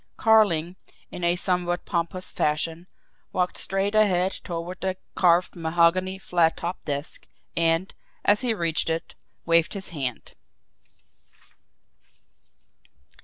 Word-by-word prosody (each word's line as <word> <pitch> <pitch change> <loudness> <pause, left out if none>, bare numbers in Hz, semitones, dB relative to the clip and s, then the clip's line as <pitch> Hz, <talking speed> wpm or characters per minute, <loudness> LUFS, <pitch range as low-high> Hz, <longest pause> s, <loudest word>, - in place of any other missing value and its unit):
Carling, 185 -6 +3 0.3
in 180 - -7
a 170 0 +3
somewhat 175 -1 0
pompous 175 +1 0
fashion, 160 +3 -1 0.4
walked 180 0 0
straight 195 +2 -1
ahead 190 -4 +3
toward 175 +1 -5
the 190 -1 -2 0.2
carved 175 -1 +3
mahogany 170 +3 +2
flat 175 -3 +1
topped 175 +2 -5
desk, 145 +1 -4 0.3
and, 165 +2 +1 0.3
as 205 +3 +4
he 250 -2 +1
reached 165 -3 -1
it, 165 +1 -3 0.3
waved 165 +3 +3
his 195 -1 -3
hand. 130 - -5
175 Hz, 110 wpm, -25 LUFS, 165-185 Hz, 0.4 s, as